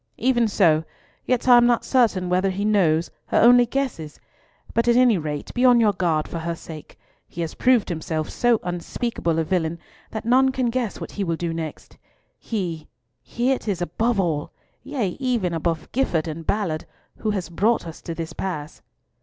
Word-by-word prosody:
"Even 240 -1 +2
so. 165 -7 +3 0.4
Yet 250 0 0
I 245 -1 +8
am 240 0 +5
not 240 -1 +2
certain 220 -8 +2
whether 185 +2 +1
he 195 +2 -2
knows 175 -6 +2 0.2
or - - +3
only 245 +1 +6
guesses; 235 - -3 0.5
but 230 +1 +1
at 235 - +5
any 245 -6 +5
rate 150 -2 -5
be 250 - 0
on 245 -2 +6
your 215 -3 +4
guard 165 -5 0
for 170 - -5
her 170 +1 -3
sake. 160 -2 -11 0.3
He 170 - -7
has 165 - -3
proved 250 -5 +3
himself 160 -2 -3
so 240 -2 +2
unspeakable 175 0 -2
a 165 - +2
villain 170 -1 -1 0.3
that 220 0 -6
none 260 +3 +4
can 255 -2 0
guess 240 -4 -2
what - - -7
he 205 - -3
will 170 -3 -1
do 170 0 -3
next. 160 -2 -7 0.4
He—he 175 - -4
it 260 - -2
is 195 -5 -1
above 215 +6 0
all—yea, 195 - -3
above 180 - -10
even 200 - 0 0.3
Gifford 175 -12 0
and 160 +1 -6
Ballard, 180 -7 -1 0.3
who 220 - -2
has 195 -4 -2
brought 210 +7 +1
us 165 -1 -9
to 165 - -6
this 165 -1 -5
pass." 155 -5 -5
190 Hz, 180 wpm, -23 LUFS, 165-240 Hz, 0.5 s, I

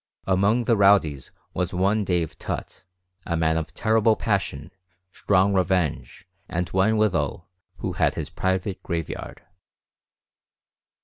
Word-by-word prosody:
Among 100 +6 +2
the 115 0 +2
rowdies 95 -9 +3 0.2
was 90 0 -2
one 100 +4 +2
Dave 90 -4 -1
Tutt, - - -6 0.4
a 85 - 0
man 80 0 +2
of 80 -1 -3
terrible 110 +1 +3
passion, 95 -9 -2 0.4
strong 100 0 +2
revenge, 90 -3 -1 0.2
and 90 +1 -2
one 100 +4 +2
withal 95 -4 0 0.3
who - - -3
had - - +1
his - - -5
private 95 +1 -2
graveyard. 85 -3 -5
95 Hz, 120 wpm, -24 LUFS, 85-100 Hz, 0.4 s, rowdies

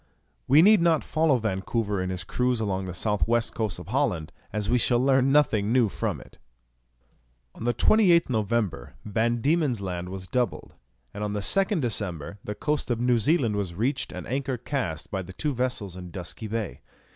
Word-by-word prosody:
We 145 +5 +7
need 210 -1 +6
not 165 -3 +3
follow 155 -3 +2
Vancouver 105 -1 -1
in 90 - -2
his 90 -2 -4
cruise 125 +7 0
along 95 -3 -1
the 90 - -5
south 105 +2 0
west 120 0 +1
coast 110 -6 -2
of 90 +2 -10
Holland, 110 - 0 0.2
as 105 0 -2
we 125 +2 +3
shall 120 +1 +3
learn 135 +1 +3
nothing 115 -8 +3
new 120 -3 +3
from - - -3
it. - - -16 1.1
On 115 - -8
the 120 - +2
28th 175 - +4
November 110 - -1
Van 115 +2 0
Diemen's 145 -5 +1
Land 90 -2 -4
was 95 0 -6
doubled, 120 +1 -2 0.4
and 105 - -5
on 105 -1 -2
the 105 - -1
2nd 195 - +2
December 100 - -3
the 105 - -5
coast 150 +3 -2
of 120 -2 0
New 120 -1 +3
Zealand 120 -3 +2
was 95 -4 -3
reached 130 +7 -1
and - - -7
anchor 135 0 -2
cast 90 - -4
by 95 - -2
the 95 0 -10
two 145 +9 -2
vessels 120 -7 -2
in 90 -1 -8
Dusky 90 +5 -6
Bay. 110 -1 -4
115 Hz, 190 wpm, -26 LUFS, 95-130 Hz, 1.1 s, We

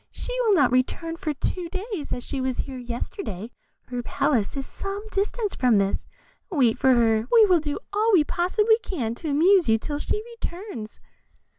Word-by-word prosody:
She - - -6
will 440 -4 +4
not 280 -8 +4
return 295 +6 0
for 315 -2 -3
two 345 +5 -3
days, 380 -3 -5
as 245 - -3
she 275 0 -4
was 260 -1 -1
here 265 -2 -7
yesterday; 235 - -5 0.4
her 245 -1 -3
palace 245 -2 0
is 270 - -3
some 395 +6 -6
distance 410 +1 -1
from 245 -4 +3
this; 195 0 0 0.4
wait 260 - +2
for 265 -2 +5
her, 225 -1 +2
we 455 -2 +8
will 365 -4 +4
do 295 -1 -3 0.2
all 430 +2 +2
we 355 -7 +6
possibly 420 +8 +2
can 275 - -3
to 310 +6 -5
amuse 340 - +4
you 225 - +5
till 290 +6 -4
she 425 +7 -2 0.2
returns." 340 - -6
300 Hz, 180 wpm, -25 LUFS, 245-390 Hz, 0.4 s, we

